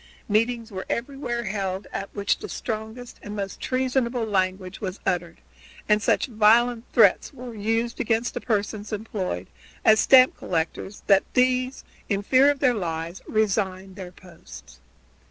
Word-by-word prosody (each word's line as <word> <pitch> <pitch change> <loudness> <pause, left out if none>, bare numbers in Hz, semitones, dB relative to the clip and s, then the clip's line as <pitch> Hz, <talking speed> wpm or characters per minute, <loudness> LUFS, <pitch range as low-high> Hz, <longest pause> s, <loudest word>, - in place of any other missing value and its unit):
Meetings 230 +2 0
were 190 -1 -6
everywhere 240 -1 -3
held, 195 -2 -3
at 195 - -4
which 200 0 0
the - - -7
strongest 220 +2 -6
and 205 0 -7
most 195 -2 -5
treasonable 255 -2 0
language 185 -2 -1
was 190 -1 -4
uttered, 175 -2 -2 0.5
and 210 0 +3
such 270 - +2
violent 230 0 +3
threats 210 -6 +4
were 250 -4 -9
used 225 +2 -1
against 230 +2 0
the - - -4
persons 210 -1 -2
employed 200 - -3 0.4
as 220 0 +6
stamp 255 -1 +6
collectors 170 +4 -3
that 195 -1 +5
these, 255 +1 +1 0.3
in 200 -2 0
fear 265 +6 +5
of 290 - +1
their 260 -3 +3
lives, 170 -3 -4
resigned 195 -3 -1
their 185 -3 -8
posts. 175 - -14
215 Hz, 145 wpm, -24 LUFS, 190-240 Hz, 0.5 s, as